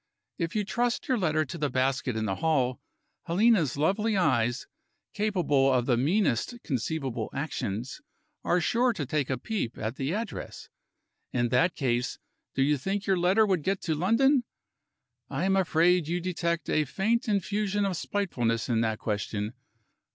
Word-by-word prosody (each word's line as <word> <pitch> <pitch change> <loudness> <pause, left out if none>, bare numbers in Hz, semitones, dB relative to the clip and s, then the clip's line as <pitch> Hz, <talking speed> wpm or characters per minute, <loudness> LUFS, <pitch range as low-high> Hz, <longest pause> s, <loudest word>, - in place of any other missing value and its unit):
If 165 +1 -2
you 210 -1 +1
trust 240 +3 -1
your 255 -3 +1
letter 155 -4 +1
to 170 +2 -7
the 145 -1 0
basket 130 -1 0
in 110 0 -1
the 95 -2 -2
hall, 135 -6 +1 0.5
Helena's 180 - +3
lovely 200 +8 +1
eyes 125 -7 +1 0.5
capable 175 -11 +2
of 125 -2 +2
the 125 - +3
meanest 155 - +1
conceivable 130 -4 -2
actions 130 - -4 0.4
are 180 - +2
sure 240 +8 +2
to 165 -10 -3
take 140 0 -1
a 130 - 0
peep 205 - -3
at 115 +4 -4
the 135 +2 -2
address. 215 +3 -5 0.6
In 120 -1 0
that 165 +8 +2
case, 125 -2 -1 0.4
do 135 - +3
you 145 0 +2
think 195 +7 -2
your 195 -2 +2
letter 190 +5 +4
would 190 -5 +1
get 195 +5 0
to 160 - -1
London? 235 - +3 0.9
I - - -1
am 195 0 +3
afraid 175 -2 +3
you 175 +2 -1
detect 170 -2 -2
a 155 - +2
faint 220 - 0
infusion 205 0 0
of 190 -2 -1
spitefulness 125 - -1
in 115 -2 +2
that 110 -1 0
question. 105 -1 -3
160 Hz, 160 wpm, -28 LUFS, 130-195 Hz, 0.9 s, letter